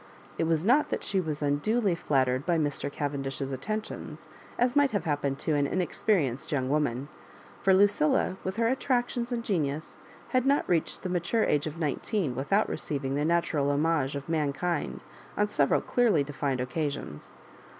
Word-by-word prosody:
It - - +2
was 160 +1 +1
not 270 +7 +4
that - - -2
she 195 -2 +1
was 155 -3 -3
unduly 190 +9 +1
flattered 130 -6 +1
by 175 0 +1
Mr. 145 -2 -1
Cavendish's 135 -1 -3
attentions, 215 +12 -5 0.3
as 245 +2 +2
might 285 -1 +5
have 200 -5 0
happened 145 -4 -1
to 155 - -1
an 145 -1 +2
inexperienced 175 - 0
young 130 -3 0
woman; 140 -3 0 0.5
for 195 - +3
Lucilla,. 190 -3 +3
with 190 +1 -3
her 230 0 +2
attractions 245 -1 0
and 235 -1 -2
genius, 155 -8 -2 0.3
had 255 -1 +2
not 280 +1 +2
reached 170 -3 0
the 185 - -2
mature 180 +6 +1
age 150 +1 +1
of 155 +1 -6
nineteen 165 - -1
without 195 - +1
receiving 135 -3 -2
the 145 +1 0
natural 160 -3 +1
homage 145 -1 +1
of 140 -1 -5
mankind 160 +1 -1 0.4
on 210 - +3
several 150 -9 +2
clearly 225 - +2
defined 140 -2 -2
occasions. 140 - -4
155 Hz, 160 wpm, -28 LUFS, 140-200 Hz, 0.5 s, might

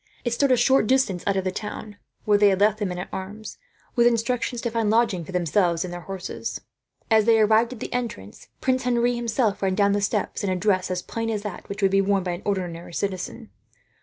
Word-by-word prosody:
It 240 - 0
stood 275 +3 +2
a 255 - +5
short 250 -1 +4
distance 255 -9 +1
out 200 -1 +2
of 190 - 0
the 185 - -1
town, 210 +1 -7 0.3
where 210 - +4
they 205 - +6
had 190 -1 +1
left 210 +1 +3
the 205 - 0
men 180 -1 -4
at 180 - -5
arms, 205 +3 -7 0.4
with 240 -1 +5
instructions 240 +1 0
to 235 - -2
find 225 -2 0
lodgings 220 -7 +1
for - - -7
themselves 175 -1 +1
and 175 - -6
their 175 - -6
horses. 195 0 -5 0.5
As 220 -1 +5
they 225 -1 +5
arrived 220 +3 +3
at 240 - -11
the - - -5
entrance, 230 - -5
Prince 255 -1 0
Henri 240 0 +2
himself 235 -2 0
ran 190 -1 +1
down 200 +1 +3
the 205 0 +1
steps, 200 - -1
in 200 - 0
a 185 - +1
dress 185 0 +1
as 180 0 -2
plain 230 0 -3
as 210 -2 -2
that 205 -4 -7
which 200 0 -5
would 195 - +4
be 195 0 +4
worn 195 -1 +1
by 180 - -2
an 175 +2 -5
ordinary 175 -4 -3
citizen. 200 +3 -4
205 Hz, 235 wpm, -24 LUFS, 185-230 Hz, 0.5 s, they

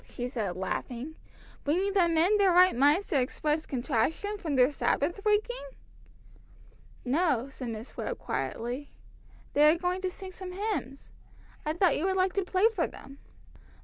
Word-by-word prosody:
she 245 - -4
said, 215 -8 -3
laughing. 240 - -4 0.5
"Bringing 370 +7 +1
them 340 -4 +3
in 365 +6 +4
their 390 -2 +5
right 365 +1 +6
minds 290 +9 +4
to 275 - +2
express 300 +4 -1
contrition 315 - -1
for 340 - -5
their 255 +2 +5
Sabbath 345 +6 -1
breaking?" 430 +4 +1 1.4
"No," 275 -2 +1
said 255 -2 -7
Miss 225 +2 -7
Webb - - -4
quietly. 245 +5 -4 0.6
"They 300 +1 +6
are 335 - +1
going 360 +2 -1
to 375 - -1
sing 380 0 -9
some 370 0 -8
hymns. 375 - -4 0.6
I 305 - +1
thought 345 -2 +3
you 330 - -1
would 380 0 +1
like 370 0 +2
to 395 - 0
play 375 +3 +3
for 360 -6 0
them." 275 +1 -13
325 Hz, 160 wpm, -29 LUFS, 265-375 Hz, 1.4 s, right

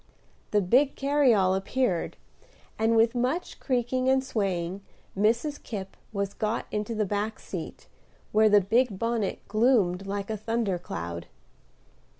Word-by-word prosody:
The 210 - +2
big 260 +10 +3
carryall 260 -10 +3
appeared, 195 -2 -1 0.6
and, 225 +1 +3
with 225 +1 +4
much 255 +8 -2
creaking 255 0 0
and 265 0 +3
swaying 195 -6 -2 0.3
Mrs. 230 +9 +1
Kipp 195 -4 -6 0.2
was 200 -2 -2
got 215 +2 -2
into 210 +2 -2
the 215 -1 +1
back 205 +2 -2
seat, - - -7 0.5
where 215 0 +5
the 205 -1 +6
big 225 +2 +2
bonnet 230 -2 -2
gloomed 210 -5 +2
like 200 +1 -3
a 215 - -2
thunder 215 -3 -1
cloud. 85 - -6
215 Hz, 135 wpm, -27 LUFS, 195-245 Hz, 0.6 s, the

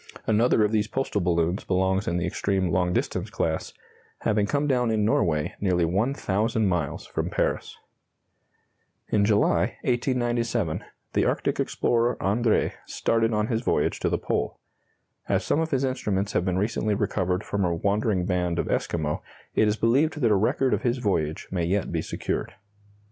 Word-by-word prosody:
Another 110 0 +3
of 105 - -1
these 105 -1 +1
postal 130 -5 -1
balloons 85 +1 +1
belongs 95 +2 +1
in 85 - 0
the 90 - -1
extreme 95 -3 0
long 90 +1 +1
distance - - -1
class, 80 -1 -2 0.5
having 105 -2 +1
come 145 +5 0
down 125 -4 +2
in 110 -2 +1
Norway 75 -8 +1
nearly 90 -4 +2
1,000 110 - 0
miles 90 -6 -1
from - - -3
Paris. - - -1 1.3
In 105 - +3
July, 105 -1 +2
1897, 120 - 0 0.3
the - - +2
Arctic - - 0
explorer 120 +1 +1
Andrée 110 +3 +2 0.2
started 115 0 +1
on 105 -1 +1
his 115 0 -1
voyage 75 -11 0
to - - 0
the - - +1
Pole. - - -2 0.7
As - - +1
some - - +1
of 160 0 0
his 135 -3 0
instruments 105 -7 -1
have 90 - 0
been 90 -1 0
recently 105 +1 0
recovered 90 -1 -1
from 100 -1 -1
a 85 -2 +1
wandering 100 +1 0
band 90 -2 0
of - - -1
Esquimaux, 75 -2 -1 0.3
it 110 - +3
is 105 +1 +1
believed 140 +8 +2
that 115 -3 +3
a - - +5
record 120 +6 +2
of - - 0
his 120 0 0
voyage 85 -10 -1
may 90 -2 -1
yet 95 +3 0
be - - -1
secured. - - -3
105 Hz, 165 wpm, -26 LUFS, 90-115 Hz, 1.3 s, a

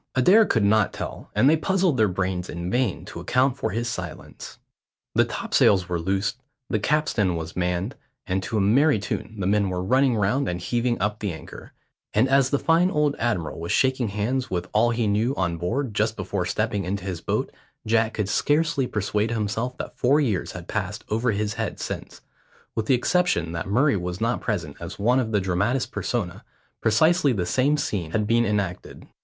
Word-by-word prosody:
Adair 195 - +6
could 115 - +2
not 105 0 +3
tell, - - -6
and 110 +6 +4
they 155 - +6
puzzled 185 -1 +1
their 110 -3 +3
brains 90 -1 -2
in 85 +1 -4
vain 125 -5 0
to - - -8
account 130 +1 +1
for 135 - -2
his 115 +5 -2
silence. 90 -7 -7 0.6
The - - +4
topsails 95 -3 +2
were 90 -2 -1
loosed, 95 +6 -1 0.3
the 110 - +1
capstan 105 - +1
was 80 0 -5
manned, 90 +5 -1 0.3
and 95 0 -1
to 110 +3 -3
a - - +2
merry 130 +7 +4
tune 105 +2 -4
the 95 - -1
men 100 0 +2
were 90 0 -2
running 130 +5 +3
round 110 +7 +1
and 90 0 -3
heaving 120 +2 -1
up 105 +2 -1
the 105 -3 -2
anchor, 80 - -10 0.4
and 110 +5 +4
as 135 -1 +3
the 140 - +2
fine 165 +5 +3
old 150 -4 +1
admiral 105 -11 -1
was 85 +1 -4
shaking 130 -2 +2
hands 110 +6 -2
with 90 -1 -2
all 110 +3 +4
he 115 -1 0
knew 110 +6 +1
on 85 -3 -1
board 115 - -2
just - - 0
before - - -3
stepping 100 -1 -1
into 95 +1 -3
his 90 -4 -4
boat, - - -1 0.3
Jack 110 0 +1
could 105 -3 -1
scarcely 145 +4 +1
persuade 105 +1 -1
himself 115 +2 -2
that - - -7
four 140 +4 +4
years 115 - -1
had 90 -1 -8
passed 105 +1 -3
over 115 +4 0
his 105 -1 -1
head - - -4
since, - - -6 0.5
with 110 -1 -2
the 130 - +5
exception 125 - +1
that 85 +1 -4
Murray 135 +7 +3
was 90 0 -4
not 115 +2 0
present 85 -10 -3
as - - -7
one 120 +6 +3
of 115 -4 -1
the 105 - +2
dramatis 100 +8 0
persona, 100 -8 -3 0.4
precisely 145 +6 +3
the 95 -5 -1
same 130 +11 +2
scene 100 - -2
had 105 +5 0
been 115 +2 +3
enacted. 100 -4 -3
110 Hz, 195 wpm, -24 LUFS, 95-130 Hz, 0.6 s, Adair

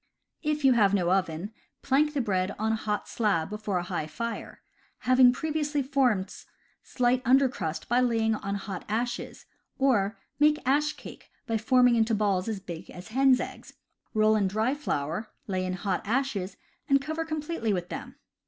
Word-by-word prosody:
If 300 -2 -1
you 265 - +7
have 205 -4 +4
no 180 -2 +1
oven, 185 +1 0 0.3
plank 295 +2 +2
the 280 - +2
bread 190 -3 -1
on 220 +1 0
hot 215 -1 -2
slab 200 -6 0
before 210 -2 -2
a 175 - -1
high 175 -4 -3
fire, 230 +7 -6 0.4
having 255 0 +6
previously 295 +1 -1
formed 255 -8 +1 0.5
slight 250 0 +1
under 265 +3 +5
crust 160 -10 -4
by 240 +1 +3
laying 225 -3 +2
on 200 -2 -3
hot 195 -2 -5
ashes; 240 +3 -3 0.3
or, 225 -6 +2 0.2
make 300 +1 +5
ash 295 +3 +2
cake - - -12 0.2
by 225 -3 -1
forming 250 +2 +4
into 225 0 +2
balls 200 -2 +1
as 220 -3 -2
big 175 -2 -8
as 180 +4 -10
hen's 260 +2 +4
eggs, - - -7 0.4
roll 215 0 +4
in 205 -2 +2
dry 220 +6 0
flour, 190 - -3 0.2
lay 185 -2 -2
in 185 - -2
hot 185 0 -2
ashes 225 -5 -1 0.3
and 275 0 +5
cover 315 +3 -3
completely 310 -7 -2
with 180 -2 -2
them. - - -7
225 Hz, 170 wpm, -28 LUFS, 195-265 Hz, 0.5 s, you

